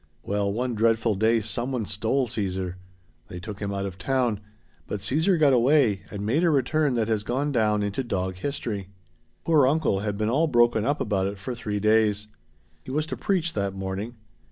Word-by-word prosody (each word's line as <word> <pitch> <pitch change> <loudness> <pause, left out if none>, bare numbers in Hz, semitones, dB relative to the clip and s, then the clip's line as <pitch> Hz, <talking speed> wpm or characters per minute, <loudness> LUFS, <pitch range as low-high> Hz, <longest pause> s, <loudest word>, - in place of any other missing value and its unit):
Well, 100 0 -1
one 125 +4 -1
dreadful 115 0 +2
day 110 +3 +2
someone 120 +2 -2
stole 110 +7 0
Caesar. 95 -5 -3 0.5
They 90 - -7
took 105 +2 -8
him 100 -1 -3
out 100 0 -2
of 95 -1 -6
town, 125 -2 0 0.5
but 105 - -3
Caesar 160 - +2
got 145 -4 +4
away 125 -5 +3
and 100 0 -5
made 140 +11 +1
a 175 - +4
return 145 -1 +2
that 115 -2 +1
has 110 -2 0
gone 130 +7 -1
down 105 -4 +2
into 100 +6 -2
dog 95 -5 -2
history. 105 -5 -4 0.6
Poor 150 -5 +5
uncle 140 -8 +1
had 105 0 -3
been 110 0 0
all 145 +8 +2
broken 120 -5 +3
up 145 +2 0
about 95 -3 0
it 100 +1 -5
for 100 +6 -5
three 105 -4 -3
days. 105 0 +2 0.6
He - - -11
was 150 +3 0
to 155 - -5
preach 175 -4 0
that 100 -2 -2
morning. 95 +5 -4
110 Hz, 190 wpm, -25 LUFS, 100-130 Hz, 0.6 s, Poor